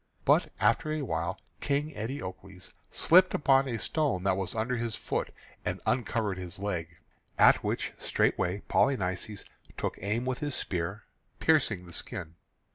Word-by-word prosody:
But - - +4
after 115 +9 +2
a 155 -1 -1
while 80 - -2 0.2
King 145 +2 0
Eteocles 95 -7 -7 0.2
slipped 185 +2 +5
upon 135 -1 +4
a 120 -3 -2
stone 140 - 0
that 95 -1 +3
was 95 +1 -3
under 115 +3 0
his 115 -1 -2
foot, - - -2 0.3
and - - -2
uncovered 110 -5 0
his 90 -2 -6
leg, 95 -5 -2 0.5
at - - +6
which - - -2
straightway 90 +3 +1
Polynices 100 -5 +1 0.3
took - - -3
aim 105 +6 -1
with 130 -1 -1
his 145 -2 -2
spear, 90 +4 -3 0.4
piercing 120 - +2
the 85 - -12
skin. 80 0 -6
110 Hz, 145 wpm, -30 LUFS, 95-135 Hz, 0.5 s, at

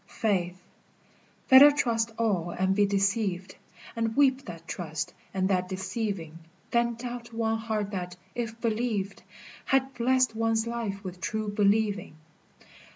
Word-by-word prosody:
FAITH. 185 -4 -1 0.9
Better 270 +2 +10
trust 230 -6 0
all 195 -7 0
and 190 +2 0
be 205 0 +4
deceived, 195 -2 0 0.4
And 225 -1 -1
weep 270 -1 +3
that 165 -2 -9
trust 160 -3 -4 0.2
and 190 -1 0
that 180 -1 0
deceiving, 190 -4 -4 0.3
Than 235 0 +2
doubt 240 0 -7
one 225 -1 0
heart 215 -2 -2
that, 180 -2 -4 0.2
if 230 -2 -4
believed, 220 -4 -1 0.4
Had 270 0 +1
blessed 255 -1 +2
one's 225 0 +1
life 230 -4 -4
with 180 -1 -7
true 215 +4 -2
believing. 205 -3 +1
215 Hz, 130 wpm, -28 LUFS, 190-235 Hz, 0.9 s, Better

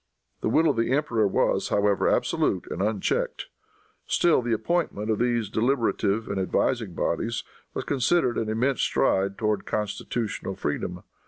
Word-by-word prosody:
The - - -1
will 160 +8 +4
of 140 -6 +1
the 115 +2 +1
emperor 120 -7 +2
was, 95 - +1
however, 100 -1 +2
absolute - - +1
and - - -3
unchecked. 105 -1 -1 0.6
Still 170 -6 +3
the 120 0 -3
appointment 115 - 0
of 110 - 0
these 120 -2 +1
deliberative 115 -3 0
and 100 -1 -2
advising 100 +1 0
bodies 115 +7 -1 0.3
was - - -2
considered 135 0 +1
an 110 - -2
immense 125 +4 +1
stride 100 +1 +1
towards 105 -2 0
constitutional 105 -1 -3
freedom. 75 - -3
110 Hz, 145 wpm, -26 LUFS, 100-125 Hz, 0.6 s, will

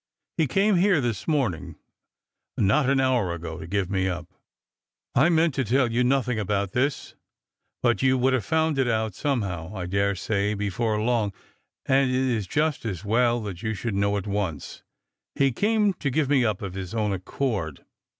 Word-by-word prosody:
He 160 -3 +2
came 195 +7 +2
here 185 -2 +4
this 120 -6 -2
morning, 125 - -1 0.8
not 130 +8 +3
an 140 0 +3
hour 125 -10 +1
ago, 80 -1 -7
to 80 - -8
give 100 0 -1
me 95 -1 +1
up. 85 -2 -4 0.9
I 145 +7 +4
meant 165 -2 +3
to 130 - 0
tell 125 +1 +2
you 120 +2 +2
nothing 125 -2 +1
about 100 -1 -1
this; 135 +5 -1 0.7
but 120 -1 +2
you 130 -1 +3
would 130 +1 +2
have 130 -4 +1
found 160 -2 +1
it 130 - +2
out 110 -2 0
somehow, 95 - -2
I 95 -3 -4
daresay, 100 +2 0
be 100 0 -2
fore 110 0 0
long, 110 -3 0 0.5
and 135 0 +3
it 125 - 0
is 125 -6 0
just 150 - 0
as 100 -3 -4
well 120 +1 +2
you 110 +5 -4
should 110 +3 -3
know 100 +1 +1
at 100 - -4
once. 100 -8 -3 0.5
He 135 -1 +3
came 210 - +2
to 145 -6 -3
give 140 +1 0
me 135 -3 +4
up, 105 -4 -1
of 95 -2 -5
his 95 +2 -6
own 105 -2 0
accord. 95 - -3
115 Hz, 180 wpm, -25 LUFS, 100-135 Hz, 0.9 s, here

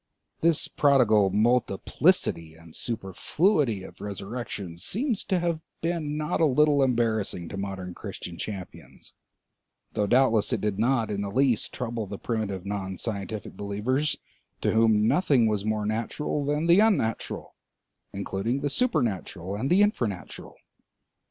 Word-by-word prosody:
This 165 -2 +3
prodigal 115 -8 +4
multiplicity 100 -6 +1
and 80 0 -15
superfluity 115 - 0
of - - -12
resurrections 100 -3 -5
seems 230 - 0
to 190 - +1
have 170 -2 -1 0.2
been 160 -3 -2
not 150 +1 -1
a - - +6
little 145 +1 +4
embarrassing 110 -8 0
to - - -6
modern 95 -2 -5
Christian 85 - -7
champions, 95 0 -8 0.8
though 105 - 0
doubtless 120 -2 +3
it 120 - +1
did 105 0 -2
not 115 -1 +1
in 100 -1 -2
the 100 - -3
least 125 +1 +2
trouble 115 -3 -4
the 100 +1 -6
primitive 100 -5 -3
non 95 -2 -4
scientific 105 0 -5
believers, 110 +9 -1 0.4
to - - +2
whom 110 -1 +4
nothing 140 -9 +3
was 105 -2 0
more 110 -1 0
natural 115 +7 -2
than 150 +3 0
the 170 +3 +6
unnatural, 200 - 0 0.6
including 100 +6 -2
the 145 - -1
supernatural 105 - -1
and 125 +6 -2
the 185 +3 +5
infranatural. 115 - -2
110 Hz, 135 wpm, -27 LUFS, 100-140 Hz, 0.8 s, a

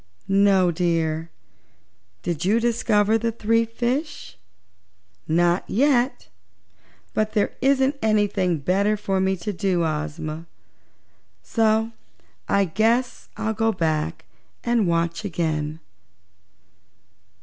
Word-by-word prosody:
"No, 195 -2 +4
dear. 165 -1 -1 0.9
Did 170 -1 -2
you 210 +5 +3
discover 225 -2 +2
the 230 +1 -1
three 230 +1 +1
fishes?" 250 - -3 0.9
"Not 175 +2 +2
yet. 255 +2 +1 0.9
But 215 0 0
there 205 - +1
isn't 270 +1 +2
anything 205 -5 +1
better 195 +8 +1
for 195 -2 -1
me 190 0 +1
to 190 +4 -4
do, 180 -2 0
Ozma, 155 +1 -4 1.0
so 225 0 +1 0.6
I 200 0 +3
guess 225 +8 0
I'll 220 - -1
go 225 +1 +1
back 160 -5 -2 0.4
and 235 -4 +2
watch 170 +2 0
again." 155 -4 -2
200 Hz, 100 wpm, -23 LUFS, 170-225 Hz, 1.0 s, No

